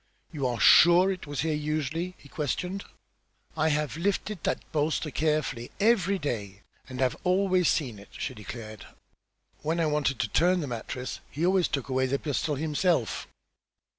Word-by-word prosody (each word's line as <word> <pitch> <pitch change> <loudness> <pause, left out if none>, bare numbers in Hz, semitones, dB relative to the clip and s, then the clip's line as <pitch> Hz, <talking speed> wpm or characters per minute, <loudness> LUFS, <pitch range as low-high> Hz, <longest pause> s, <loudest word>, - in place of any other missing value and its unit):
"You 140 -6 -1
are 120 -2 -2
sure 175 +3 +7
it 185 -5 -6
was 145 -1 -2
here 160 +1 0
usually?" 155 +4 -2
he - - -16
questioned. 180 +7 -3 0.7
"I 160 0 +2
have 150 0 -1
lifted 200 +1 -1
that - - -1
bolster 155 0 0
carefully 150 -6 -1
every 200 -3 +3
day, 105 - -4 0.3
and 130 -1 -7
have 130 -1 +2
always 185 -1 +3
seen 125 -9 -1
it," 100 - -14
she - - -3
declared. 110 0 -9 0.7
"When 160 +3 -1
I 165 - +2
wanted 150 -3 +1
to 115 - 0
turn 180 - +3
the - - -2
mattress 125 +1 -5
he 155 +5 -2
always 185 -1 +3
took 140 -2 -3
away 130 0 +1
the 140 +2 0
pistol 145 +1 -1
himself." 155 - 0
150 Hz, 165 wpm, -28 LUFS, 130-175 Hz, 0.7 s, sure